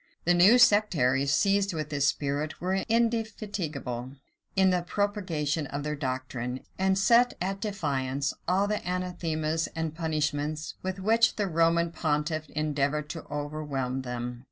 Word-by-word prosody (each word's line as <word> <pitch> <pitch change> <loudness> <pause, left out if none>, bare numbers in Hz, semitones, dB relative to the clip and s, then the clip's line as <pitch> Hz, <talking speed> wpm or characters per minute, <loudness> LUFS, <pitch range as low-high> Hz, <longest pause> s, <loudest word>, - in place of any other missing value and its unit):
The 175 - +5
new 185 +8 +7
sectaries 155 - +4
seized 195 +3 +2
with 155 -1 -3
this 145 -1 +1
spirit, 145 +2 -1
were 185 +2 -1 0.2
indefatigable 205 - -1 0.4
in 190 -1 +4
the 180 -1 +1
propagation 175 -6 -1
of 140 +1 -4
their 150 0 -2
doctrine, 130 -2 -4 0.2
and 190 0 +2
set 235 +5 +4
at 195 +2 -2
defiance 140 - -1
all 185 +3 +3
the 210 +1 -2
anathemas 165 -3 -2
and 160 -1 -2
punishments 155 -1 -2
with 185 0 -3
which 225 +4 +3
the 210 - 0
Roman 170 -1 +2
pontiff 155 -1 -1
endeavored 150 0 -1
to 165 - -7
overwhelm 145 -3 -3
them. 125 -1 -5
160 Hz, 135 wpm, -28 LUFS, 145-190 Hz, 0.4 s, new